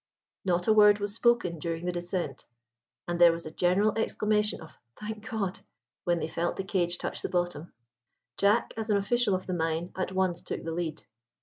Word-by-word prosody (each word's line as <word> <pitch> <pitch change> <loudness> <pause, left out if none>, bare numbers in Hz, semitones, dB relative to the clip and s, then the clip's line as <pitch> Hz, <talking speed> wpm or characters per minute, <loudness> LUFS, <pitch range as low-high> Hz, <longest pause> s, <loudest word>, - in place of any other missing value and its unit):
Not 175 -2 0
a 220 - +6
word 210 -1 +7
was 205 0 -3
spoken 230 -8 +2
during 165 +2 -3
the 180 - 0
descent, 175 +1 -4 0.6
and 175 0 -2
there 170 -1 +9
was 165 0 -5
a 155 - -6
general 185 +6 +2
exclamation 210 -1 +1
of 160 - -13 0.2
"Thank 215 +1 -6
God!" 200 -5 -2 0.5
when 175 -1 +2
they 160 - -2
felt 170 +1 -2
the 195 - -3
cage 180 -3 0
touch - - -4
the - - -3
bottom. 175 -3 -2 0.6
Jack, 205 +4 +2
as 220 0 -3
an 205 - +4
official 205 0 +2
of 185 - -4
the 185 - -3
mine, 165 0 -1
at 190 0 -2
once 185 -2 0
took - - -5
the 165 - -4
lead. 160 -2 -3
185 Hz, 195 wpm, -29 LUFS, 175-210 Hz, 0.6 s, there